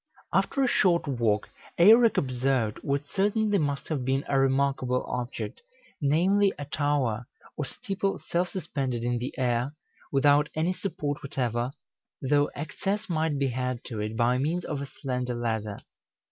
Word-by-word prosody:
After 275 - +2
a - - +3
short 175 -9 +3
walk, 115 -6 +1 0.3
Eirek 225 +6 +7
observed 130 -4 0
what 140 +1 -1
certainly 205 +2 +1
must 145 -3 -1
have 145 -5 -1
been 135 +2 0
a 135 - +2
remarkable 135 -1 +1
object, 125 - -4 0.4
namely, 185 +8 +3
a 145 - -5
tower 140 -6 0 0.3
or 150 - -2
steeple 195 +6 -2
self 175 +1 -1
suspended 140 - -3
in 120 0 0
the 125 - -3
air, 125 +2 0 0.4
without 145 +1 +4
any 165 +4 +1
support 150 -7 -3
whatever, 125 -3 -1 0.5
though 145 +2 +2
access 195 +8 -3
might 160 -3 0
be 140 -1 +1
had 125 0 -2
to 110 -4 -6
it 110 +1 -3
by 125 +2 +3
means 165 +6 -1
of 145 -2 -3
a 140 - -4
slender 125 -3 -3
ladder. 110 -3 -2
140 Hz, 150 wpm, -27 LUFS, 125-160 Hz, 0.5 s, Eirek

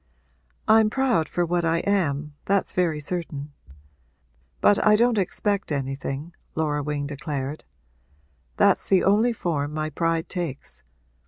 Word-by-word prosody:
'I'm 220 -1 +6
proud 240 -11 +1
for 175 - 0
what 175 +1 0
I 165 0 +2
am 150 -7 0
that's 200 0 +1
very 170 -4 +1
certain. 150 -3 -5 1.1
But 205 - +4
I 210 0 +6
don't 235 0 +3
expect 200 0 -1
anything,' 135 +3 -3 0.2
Laura 150 -2 0
Wing 145 0 -2
declared. 145 0 -5 0.9
'That's - - +3
the 190 -2 +4
only 215 +5 +4
form 150 -8 -2
my 155 0 -2
pride 165 +1 0
takes. 170 -8 -5
165 Hz, 130 wpm, -24 LUFS, 145-200 Hz, 1.1 s, I'm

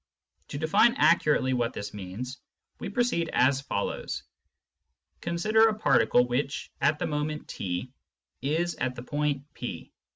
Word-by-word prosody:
To - - -5
define 200 +10 +4
accurately 150 -4 +3
what 120 -1 0
this 100 - -6
means, 105 +7 -6 0.4
we 200 - -4
proceed 220 -7 0
as 130 +2 +3
follows. - - -3 1.0
Consider 215 +6 +3
a 215 -1 0
particle 125 - +4
which, 135 +3 -2
at 155 - +3
the - - -2
moment 150 0 -3
/, 95 +8 -7
is 165 +5 0
at 125 0 -1
the 120 - -7
point 145 0 -1
P. 105 -10 -6
145 Hz, 135 wpm, -28 LUFS, 125-170 Hz, 1.0 s, define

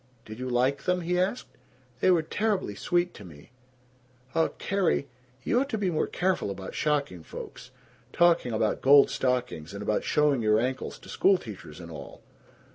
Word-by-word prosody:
"Did 110 +2 -9
you 130 0 -3
like 130 +3 +1
them?" 180 0 +1
he 180 +1 0
asked. 190 +7 -2 0.4
"They - - +3
were 175 -3 +4
terribly 200 - -1
sweet 175 - 0
to - - -11
me." 80 +2 -14 0.8
"Uh, 165 0 +3
Carrie 190 -7 0 0.4
You 240 - +2
ought 275 +2 -1
to 220 - -1
be 195 -3 0
more 155 - 0
careful 185 - 0
about 95 -1 -6
shocking 140 - -1
folks. - - -9 0.4
Talking 170 -7 +3
about 110 -1 0
gold 140 +1 +7
stockings, 125 -10 -2
and 100 - -5
about 105 - 0
showing 150 -4 +2
your 110 0 +3
ankles 130 +2 -3
to - - -16
schoolteachers 110 - 0
and 85 -1 -9
all!" 70 -3 -10
140 Hz, 170 wpm, -27 LUFS, 105-180 Hz, 0.8 s, gold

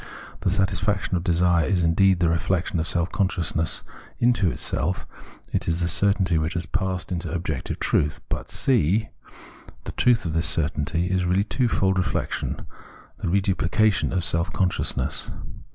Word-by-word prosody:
The - - 0
satisfaction 95 0 0
of 85 - -1
desire 85 -1 +2
is 90 -4 +1
indeed 90 +3 +3
the 85 - +4
reflexion 85 +1 0
of 80 - -1
self 85 0 0
consciousness 85 -5 -1 0.3
into 120 -6 +3
itself, 80 +3 -2 0.5
is 85 0 0
the 85 - 0
certainty 95 -3 +3
which 80 +3 -2
has 85 -1 -1
passed 95 +1 -2
into 85 -1 -3
objective 80 -5 -3
truth. 75 0 +1
But - - -4
(c) 110 - +1 0.7
the - - -5
truth 120 -4 +2
of 80 - -2
this 80 0 +2
certainty 80 +2 +1
is 95 -1 +1
reaUy 95 +4 +1
twofold 105 -7 +1
reflexion, 90 - -2 0.5
the - - -3
reduphcation 100 +3 +1
of 90 -2 0
self 85 +2 0
consciousness. 90 -2 -1
90 Hz, 145 wpm, -24 LUFS, 85-95 Hz, 0.7 s, the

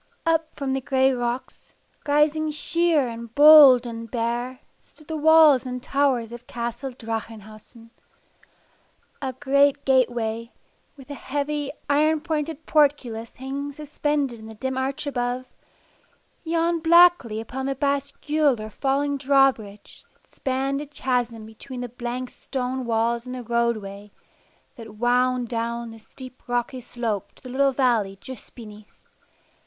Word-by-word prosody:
Up 325 -1 0
from 275 -2 -2
the 270 - -1
gray 265 0 +2
rocks, 245 0 -5 0.3
rising 300 +2 +2
sheer 310 -1 +1
and 235 0 -8
bold 290 -4 +9
and 230 -1 -7
bare, 240 +2 -3 0.2
stood 305 - -20
the 320 - -4
walls 310 -3 +6
and 250 -1 -5
towers 265 -5 0
of 240 +1 -10
Castle 235 +2 -4
Drachenhausen. 225 -1 -8 1.3
A 265 -2 -3
great 280 +2 +2
gate 260 -2 +4
way, 230 -1 -4 0.5
with 270 0 -12
a - - -3
heavy 290 +1 -3 0.2
iron 305 +2 +2
pointed 315 -1 -4
portcullis 270 -7 +1
hanging 275 +2 -5
suspended 290 -3 -2
in 220 - -11
the 220 - -10
dim 260 +4 -3
arch 265 +2 -3
above, 250 -2 -2 1.0
yawned 335 0 0
blackly 340 -10 +5
upon 265 +4 -5
the 275 - -1
bascule 280 0 0
or 215 0 -7
falling 280 +2 -1
drawbridge 265 -7 +1
that - - -34
spanned 270 +1 -2
a 295 - -7
chasm 245 -5 -2
between 245 +4 -9
the 245 - -5
blank 245 +1 -5
stone 255 -1 -4
walls 230 +1 0
and 250 - -5
the 250 - -6
roadway 215 -4 -2 0.7
that 225 -2 -11
winding 250 +2 +1
down 235 0 -4
the 225 - -12
steep 255 +3 -13
rocky 245 +1 -2
slope 230 -4 -4
to - - -22
the 255 - -9
little 275 +2 +2
valley 235 -7 +1
just 260 +1 -11
beneath. 210 -3 -13
255 Hz, 140 wpm, -24 LUFS, 235-285 Hz, 1.3 s, bold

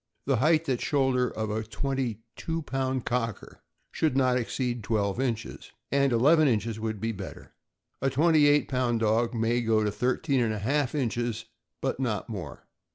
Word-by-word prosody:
The 135 -2 +2
height 155 +5 +3
at 130 -3 0
shoulder 130 -3 +1
of 110 -1 -3
a 110 +1 -1
twenty 120 0 -3
two 165 0 -3
pound 130 -2 -2
Cocker 115 -3 -3 0.3
should 150 -5 0
not 130 -2 +3
exceed 120 -1 -2
twelve 100 0 0
inches, 120 -4 -3 0.2
and 140 -1 +3
eleven 150 +7 +5
inches 110 -2 0
would 110 -1 -3
be 115 +3 -1
better. 100 -3 -9 0.5
A 135 - +2
twenty 150 +2 +4
eight 145 0 +4
pound 125 -3 0
dog 115 +2 +1
may 115 +2 +1
go 110 -2 +2
to 105 - 0
thirteen 130 +5 0
and 110 -2 +1
a - - -3
half 135 +6 0
inches, 120 -4 -2 0.4
but 135 -1 -1
not 120 -4 -2
more. 90 -10 -7
125 Hz, 170 wpm, -27 LUFS, 110-135 Hz, 0.5 s, eleven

